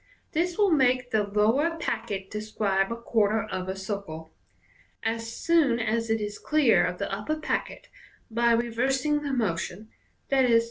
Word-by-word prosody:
This 340 +2 0
will 410 -3 +3
make 255 -4 +2
the 220 - +3
lower 225 +11 +1
packet 215 - -3
de* 210 - -3
scribe 200 -2 0
a - - -1
quarter 220 -2 +1
of 185 0 -5
a 190 - -2
circle. 190 -5 -6 0.7
As 225 0 -2
soon 305 -5 +2
as 225 0 -1
it 225 0 +1
is 210 -1 -5
clear 300 -6 +3
of 180 0 -1
the 200 0 -3
upper 210 +10 -2
packet, 310 - -3 0.4
by 235 +1 +3
reversing 260 +6 +1
the 290 -1 -3
motion 210 -3 -2 0.4
(ie. 250 -4 +5
230 Hz, 155 wpm, -27 LUFS, 205-265 Hz, 0.7 s, ie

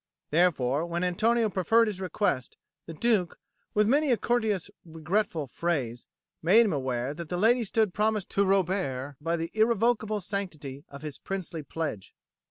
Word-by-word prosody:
Therefore, 150 -4 +2
when 170 +1 -2
Antonio 220 +6 +2
preferred 210 +4 +3
his 205 -4 -4
request, 180 -8 -1 0.3
the 165 - -6
Duke, 205 -2 +1 0.4
with 210 0 +4
many 285 +3 +3
a 240 - +4
courteous 220 -7 0
regretful 165 +1 -1
phrase, 130 -5 -2 0.3
made 210 +8 +6
him 200 - 0
aware 130 -1 -2
that 165 +1 -8
the 180 - -2
lady 235 +5 +4
stood 215 -2 +1
promised 215 -1 0
to 200 - +2
Robert 180 -9 0
by 165 +2 0
the 165 0 -4
irrevocable 220 -1 +2
sanctity 165 -9 -5
of 140 +1 -11
his 150 -2 -6
princely 185 -4 -4
pledge. 150 -10 -5
180 Hz, 155 wpm, -28 LUFS, 155-215 Hz, 0.4 s, made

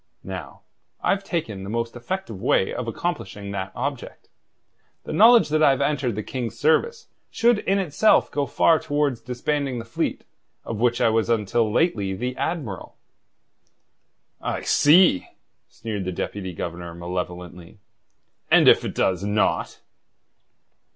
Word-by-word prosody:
Now, - - -8 0.4
I've 200 0 +1
taken 115 - -4
the 95 - -7
most 115 +2 -3
effective 120 - -5
way 95 - +2
of 125 - -4
accomplishing 115 -7 -4
that 95 -1 -4
object. 135 0 -5 0.7
The - - -6
knowledge 230 -2 +6
that 155 +1 +1
I've 140 -3 +4
entered 140 -5 0
the 105 - -4
King's 115 -2 -5
service 450 - +1 0.2
should 235 -2 +2
in 195 -1 0
itself 195 +3 +3
go 145 -1 -1
far 165 -2 +3
towards 145 -5 -1
disbanding 130 +2 -2
the 115 - -6
fleet 115 - -3 0.4
of 115 - -5
which 120 0 +1
I - - +4
was 115 +1 +1
until 110 0 +1
lately 105 - +1
the 125 +5 -3
admiral." 125 - -4 1.4
"I - - -3
see!" 155 - +4 0.4
sneered 110 -5 -5
the 95 - -2
Deputy 95 +1 -4
Governor 85 +1 -6
malevolently. 90 +1 -6 0.7
"And - - +5
if - - +6
it - - -5
does 95 0 0
not?" 105 +1 0
120 Hz, 135 wpm, -23 LUFS, 100-150 Hz, 1.4 s, knowledge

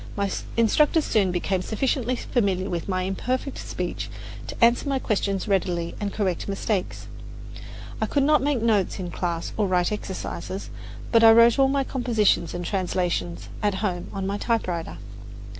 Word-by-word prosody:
My 200 -1 -1 0.3
instructors 295 +7 +3
soon 195 -4 +2
became 180 +1 -1
sufficiently 250 +4 0
familiar 195 -6 -1
with 170 +2 -3
my 185 -1 0
imperfect 255 +8 -2
speech - - -4 0.4
to - - -6
answer 240 +4 +2
my 275 - +1
questions 200 -5 -1
readily 175 -3 0
and 205 -1 -2
correct 190 -5 -1
mistakes. 195 -1 -2 1.0
I - - +1
could 280 - +1
not 300 -1 +4
make 275 -4 0
notes 210 -5 +2
in 180 -3 -5
class 170 -2 -3
or 210 -2 +2
write 180 0 +1
exercises; 195 -1 -5 0.4
but 230 -1 +5
I 225 - +10
wrote 230 +2 +6
all 270 - +6
my 275 0 +1
compositions 225 - +1
and 175 0 -4
translations 170 - -1
at 205 -2 +1
home 175 -3 -2
on 195 -1 -4
my 200 +1 -2
typewriter. 185 -9 -2
200 Hz, 160 wpm, -25 LUFS, 185-235 Hz, 1.0 s, I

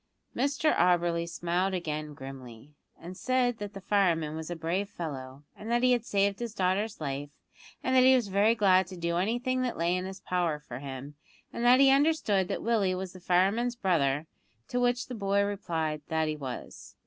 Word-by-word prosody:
Mr 285 +4 +1
Auberly 170 -1 +2
smiled 175 +3 -1
again 155 -3 -4
grimly, 135 -1 -10 0.3
and 175 +2 -9
said 245 +1 0
that 205 0 -6
the - - -5
fireman 170 -6 +1
was 160 0 -6
a 175 - -3
brave 175 +5 -2
fellow, 135 -6 -7
and 215 - -9
that 240 +1 +1
he 255 - +5
had 240 -2 +2
saved 200 -3 +1
his 235 -2 -5
daughter's 195 +3 0
life, 140 -1 -4 0.5
and 260 - +1
that 255 - +7
he 260 +1 +7
was 240 -5 +1
very 200 +4 +3
glad 190 -4 +4
to 185 0 -9
do 170 0 -1
anything 245 +7 0
that 250 -2 -2
lay 170 +2 +1
in 185 0 -2
his 190 0 -7
power 175 -5 -1
for 130 -4 -8
him, 135 +1 -7 0.4
and 235 - -4
that 245 +2 +6
he 275 -1 +7
understood 275 - +2
that - - -3
Willie 210 -5 +1
was 185 0 -5
the 185 - -11
fireman's 195 +7 +1
brother; 155 - +1 0.4
to 245 - -1
which 245 0 +1
the 255 - -8
boy 200 -2 +1
replied 165 -7 -2
that 160 -1 0
he 155 - -1
was. 135 -4 -8
185 Hz, 195 wpm, -29 LUFS, 160-230 Hz, 0.5 s, that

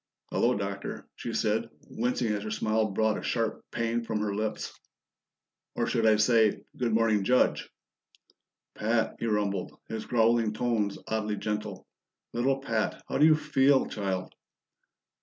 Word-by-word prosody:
"Hello, - - +2
Doctor," 100 0 -5
she - - -5
said, - - 0 0.2
wincing 120 -1 0
as 105 - -2
her 110 - -5
smile 110 0 +1
brought 110 +2 +1
a - - -7
sharp 115 -2 -1
pain 115 0 -1
from 110 -2 -2
her 105 -1 -1
lips. 110 +1 -3 1.0
"Or - - +1
should 115 -1 +1
I 110 - +6
say, 110 0 +3
Good 125 -5 -1
morning, 110 -2 +3
Judge?" 125 +6 +2 1.0
"Pat!" 115 +1 0
he 115 - -2
rumbled, 100 -3 -1
his 110 -1 -5
growling 115 -2 +3
tones 110 -3 0
oddly 110 -1 -1
gentle. 105 -2 -4 0.5
"Little 130 +3 +1
Pat! 115 -4 -1
How - - -1
do 150 - +7
you 155 - +7
feel, 140 -3 +3
child?" 95 -3 -3
110 Hz, 145 wpm, -28 LUFS, 105-120 Hz, 1.0 s, do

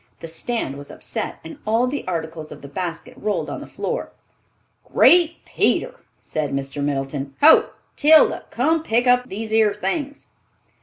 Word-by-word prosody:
The - - -7
stand 165 - -3
was 145 - -11
upset, - - -5
and 305 - -10
all 225 +3 +2
the 265 -2 -4
articles 160 -3 -4
of 150 - -11
the - - -8
basket 170 +2 -5
rolled 210 -1 -2
on - - -5
the - - -9
floor. - - -4 0.8
"Great 340 -1 +5
Peter!" - - +1 0.3
said 150 -2 -3
Mr. 140 +1 -4
Middleton, 135 -1 -3
"ho, 310 +2 +7 0.3
Tilda, 310 +1 +5
come 315 +7 +1
pick 245 -5 +1
up 250 0 +3
these 220 +2 -5
'ere 215 -2 +3
things!" 275 - -4
210 Hz, 155 wpm, -22 LUFS, -, 0.8 s, ho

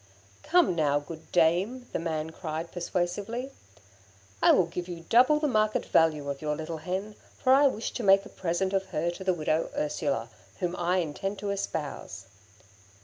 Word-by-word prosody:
'Come 345 - +3
now, 145 -3 +2
good 160 +2 -11
dame,' 180 +10 +2
the - - 0
man 160 -1 -3
cried, 160 0 -5
persuasively, 195 +8 -3 0.9
'I - - +7
will 185 - +4
give 175 +1 -5
you 170 -2 -8
double 255 +6 +5
the 300 - +1
market 215 -4 +1
value 155 -3 +2
of 140 -1 -4
your 150 -1 -1
little 160 +1 -5
hen, 185 +6 -4 0.2
for 260 - +4
I 280 +1 +6
wish 230 -4 -2
to - - -5
make 195 0 +5
a - - -10
present 185 +2 -1
of 195 0 0
her 170 0 -1
to 175 - -8
the 185 -1 +1
widow 155 0 0
Ursula, 300 0 -1 0.3
whom 180 -2 -1
I 180 +1 +1
intend 185 +4 -2
to 200 0 -3
espouse.' 145 - -4
180 Hz, 175 wpm, -28 LUFS, 160-205 Hz, 0.9 s, I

